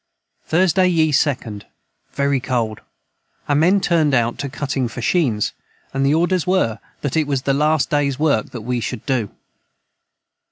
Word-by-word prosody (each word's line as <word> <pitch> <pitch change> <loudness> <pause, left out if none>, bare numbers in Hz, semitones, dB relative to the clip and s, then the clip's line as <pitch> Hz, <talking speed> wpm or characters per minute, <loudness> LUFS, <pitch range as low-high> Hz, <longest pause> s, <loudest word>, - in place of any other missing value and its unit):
Thursday 185 +2 +3
ye 160 -3 +2
2nd. 130 -7 0 0.5
Very 140 0 +1
cold 120 -5 -2 0.7
our 145 - +1
men 175 +7 +4
turned 160 -6 +2
out 120 -1 0
to 140 - -3
cutting 135 -2 -2
fashheens 120 - 0 0.2
& - - -37
the 135 +1 +1
orders 175 +1 +1
were 180 - +1 0.2
that 145 0 -2
it 155 -2 +1
was 135 -3 -1
the 135 - +1
last 150 -1 +1
days 145 -3 +1
work 145 -8 +1
that 120 - -7
we 125 +2 -2
should 105 -1 -5
do. 125 -7 0
140 Hz, 155 wpm, -20 LUFS, 125-160 Hz, 0.7 s, men